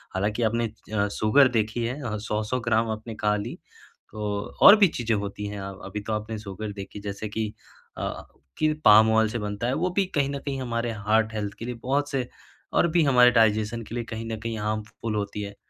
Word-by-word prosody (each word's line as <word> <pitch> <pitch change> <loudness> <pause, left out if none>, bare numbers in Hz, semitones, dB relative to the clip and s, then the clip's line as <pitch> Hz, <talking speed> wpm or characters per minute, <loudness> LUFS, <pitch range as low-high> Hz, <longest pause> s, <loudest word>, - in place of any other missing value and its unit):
हालाँकि 105 +5 0
आपने 115 +1 +1 0.3
अ, 100 -1 +2
सुगर 130 +6 +5
देखी 110 +2 -1
है 130 +5 -4
अ, 110 -3 -3
100-100 105 +3 -2
ग्राम 115 0 +1
आपने 110 +1 -6
खा 105 0 +4
ली 105 +4 -5 0.5
तो 105 - -8 0.4
और 205 - +11
भी 200 -3 +6
चीजें 120 -7 -2
होती 100 0 -4
हैं 100 0 -6
अ, 95 0 -5
अभी 100 +2 -5
तो 110 - -1
आपने 110 +1 -3
सुगर 105 0 -6
देखी 100 +1 -8
जैसे 100 +1 -5
कि, 110 +1 -2 0.5
अ, - - -4 0.3
कि 155 0 +2
पाम 110 +1 +8
ऑयल 110 0 +3
से 120 +2 -3
बनता 105 +2 -3
है, 125 - +1
वो 180 +5 0
भी 195 - +4
कहीं 140 -2 +2
न 140 0 -3
कहीं 135 -1 -4
हमारे 115 -1 -2 0.2
हार्ट 110 0 +3
हेल्थ 105 -2 -3
के 115 - -5
लिए 125 - -3
बहुत 145 +3 0
से 130 -3 -1 0.5
और 170 - +4
भी 170 - +4
हमारे 125 -3 +6
डाइजेशन 110 0 +2
के 115 - -8
लिए 120 - -2
कहीं 110 0 -4
न 110 - -3
कहीं 115 0 -3
हार्मफुल 110 +1 -3
होती 105 0 -3
है। 100 0 -7
110 Hz, 220 wpm, -26 LUFS, 105-120 Hz, 0.5 s, और